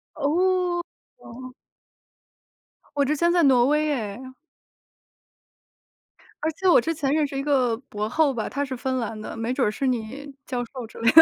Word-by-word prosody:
哦， 355 +4 +1 0.4
哦。 255 +2 -11 1.4
我 280 - +3
之 300 +3 +1
前 340 +3 +2
在 345 -1 +3
挪 255 -3 +5
威 300 +2 +2
耶。 255 -2 -3 2.1
而 315 - 0
且 380 +4 -2
我 - - +7
之 325 +7 -1
前 285 -4 -1
认 305 -1 +2
识 275 -1 -5
一 275 - -2
个 260 -5 +2
博 210 0 -3
后 295 +3 +2
吧， 225 -3 -3
他 280 - -2
是 265 -2 -4
芬 260 +1 -2
兰 225 -3 -3
的， 215 - -7
没 225 +1 -2
准 255 -3 +1
儿 - - 0
是 270 +5 -2
你 255 +4 -3
教 250 -2 -2
授 250 0 -8
之 - - -15
类 230 +1 +4
的。 320 - +11
270 Hz, 195 characters per minute, -24 LUFS, 240-305 Hz, 2.1 s, 的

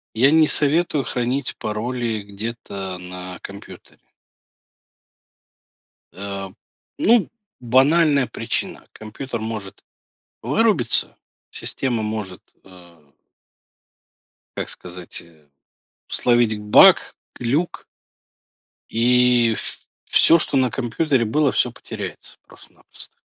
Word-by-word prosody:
Я 135 +6 +5
не 160 -1 +5
советую 150 -1 +1
хранить 125 +3 -2
пароли 115 0 -3
где-то 100 -2 -6
на 90 0 -8
компьютере. 100 0 -12 2.1
А, 100 -1 -6 0.5
ну, 230 0 +3 0.3
банальная 140 +3 +3
причина: 115 0 -4
компьютер 110 +2 -7
может 110 -3 -6 0.6
вырубиться, 165 - +2 0.4
система 120 -4 -2
может, 105 -4 -5 0.2
э 85 -5 -18 1.5
как - - -3
сказать, 90 -1 -9
э, 80 -3 -22 0.6
словить 120 -3 +2
баг, 105 0 +6 0.2
глюк 140 +9 -1 1.0
И 120 0 +3
в - - -7 0.2
всё, 165 - +6
что 145 - 0
на 130 -2 +3
компьютере 130 +1 0
было, 140 +5 +2
всё 125 - +1
потеряется - - -9
просто-напросто. - - -15
115 Hz, 90 wpm, -21 LUFS, 100-135 Hz, 2.1 s, баг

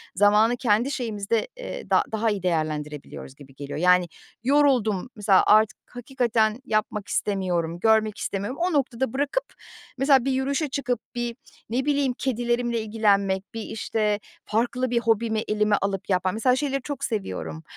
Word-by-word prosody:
zamanı 210 +4 +4
kendi 235 +2 +2
şeyimizde, 225 -3 -1
eee, - - -7
da - - +4
daha 220 +1 +1
iyi 205 -3 -2
değerlendirebiliyoruz 150 -5 -3
gibi 135 -2 -16
geliyor. 140 +1 -6
Yani, 180 0 +4 0.4
yoruldum, 255 -7 +2
mesela, 205 -3 +4
artık 215 0 +4
hakikaten 240 -3 0
yapmak 215 -3 -1
istemiyorum, 175 -4 -1
görmek 220 +1 +3
istemiyorum. 205 +7 -4
O 360 0 +1
noktada 265 -4 0
bırakıp, 285 - 0 0.5
mesela, 270 -1 +4
bir 270 - +1
yürüyüşe 275 +3 0
çıkıp, 255 -3 -1 0.2
bir, 240 -1 -3 0.3
ne 255 +4 -1
bileyim, 285 -3 +1
kedilerimle 240 -2 -1
ilgilenmek, 200 -3 +1
bir, 225 - -4
işte, 215 -1 -1 0.3
farklı 245 +3 0
bir 240 - +2
hobimi 225 -1 +1
elime 210 0 +2
alıp 195 0 -2
yapma 185 -1 +1
mesela, 250 +5 +2
şeyleri 275 0 -1
çok 280 0 -6
seviyorum, 90 - -4
220 Hz, 145 wpm, -25 LUFS, 200-255 Hz, 0.5 s, zamanı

